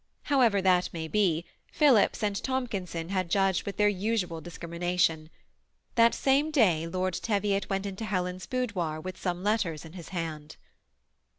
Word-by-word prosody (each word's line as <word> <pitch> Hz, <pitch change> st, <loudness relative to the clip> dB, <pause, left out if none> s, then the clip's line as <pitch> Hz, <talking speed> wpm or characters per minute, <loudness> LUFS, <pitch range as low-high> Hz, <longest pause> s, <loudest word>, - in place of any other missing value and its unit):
However 235 Hz, -9 st, +3 dB
that 180 Hz, -1 st, +3 dB
may 160 Hz, -1 st, -4 dB
be, 175 Hz, -3 st, +1 dB, 0.3 s
Phillips 265 Hz, -9 st, +4 dB
and 205 Hz, -1 st, 0 dB
Tomkin 245 Hz, -6 st, -2 dB
son 165 Hz, -1 st, -5 dB
had 185 Hz, -3 st, -1 dB
judged 195 Hz, +1 st, +1 dB
with 200 Hz, -, -4 dB
their 210 Hz, -, +4 dB
usual 195 Hz, -4 st, -1 dB
discrimination. 170 Hz, -2 st, -1 dB, 0.6 s
That 230 Hz, -1 st, +5 dB
same 280 Hz, +3 st, +2 dB
day 185 Hz, -, +3 dB
Lord 185 Hz, +1 st, -1 dB
Tevlot 200 Hz, 0 st, -1 dB
went 195 Hz, 0 st, -1 dB
into 200 Hz, +3 st, -5 dB
Helen's 180 Hz, -3 st, -2 dB
boudoir 190 Hz, -11 st, -2 dB
with 185 Hz, +3 st, -7 dB
some 180 Hz, -1 st, -2 dB
letters 200 Hz, -7 st, 0 dB
in 160 Hz, -, -12 dB
his 175 Hz, -3 st, -9 dB
hand. 160 Hz, -4 st, -5 dB
185 Hz, 155 wpm, -28 LUFS, 170-210 Hz, 0.6 s, That